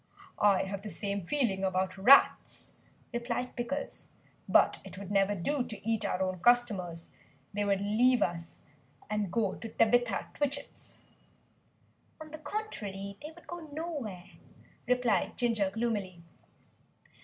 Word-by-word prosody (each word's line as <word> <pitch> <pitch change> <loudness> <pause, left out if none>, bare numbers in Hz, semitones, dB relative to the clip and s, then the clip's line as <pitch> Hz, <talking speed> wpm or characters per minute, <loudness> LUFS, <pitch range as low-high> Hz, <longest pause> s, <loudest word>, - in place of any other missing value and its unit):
"I 205 -2 +4
have 195 0 -4
the 210 - -6
same 200 -1 -2
feeling 195 -2 0
about 185 -1 0
rats," 245 +9 +5 0.4
replied 240 +1 -2
Pickles, 265 +4 -4 0.4
"but - - +5
it - - -9
would 200 0 -7
never 200 0 +3
do 255 +9 0
to 220 -3 -8
eat 225 -1 +1
our 185 - 0
own 185 -1 -2
customers; 190 -7 +2 0.4
they 205 0 0
would 200 -1 +1
leave 240 +5 +4
us 170 -1 -4 0.5
and 210 -4 -1
go 210 -3 +1
to 225 - -7
Tabitha 245 +1 +2
Twitchit's." 285 -1 -3 1.2
"On 310 -1 -10
the 310 - -7
contrary, 205 - -5
they 300 - -6
would 335 +2 -16
go 345 - -6
nowhere," 290 - -6 0.6
replied 250 -3 +1
Ginger 225 -5 +2
gloomily. 200 -5 -2
215 Hz, 130 wpm, -31 LUFS, 195-250 Hz, 1.2 s, rats